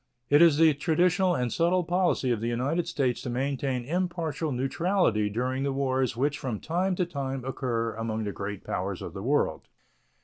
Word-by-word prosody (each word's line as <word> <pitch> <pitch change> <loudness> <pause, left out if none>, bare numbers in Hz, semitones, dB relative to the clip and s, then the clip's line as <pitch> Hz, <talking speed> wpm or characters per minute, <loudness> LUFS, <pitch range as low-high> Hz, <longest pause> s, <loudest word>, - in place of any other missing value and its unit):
It 145 +2 +7
is 165 -4 +6
the 160 -1 +6
traditional 175 +4 +2
and 125 -4 -1
settled 175 +1 +2
policy 175 -7 +1
of 115 -3 -1
the 115 - -1
United 135 +9 -1
States 130 -4 0
to - - -5
maintain 130 0 -1
impartial 165 -2 -2
neutrality 135 - +1
during 125 +5 -2
the 140 0 0
wars 130 -3 0
which 145 +3 0
from 120 -6 -3
time 180 +4 0
to 180 - 0
time 135 -5 -4
occur 115 -4 -2
among 110 0 -3
the 105 - -2
great 100 0 -6
powers 95 0 -3
of - - -7
the 95 - -6
world. 130 - 0
135 Hz, 180 wpm, -27 LUFS, 120-165 Hz, -, It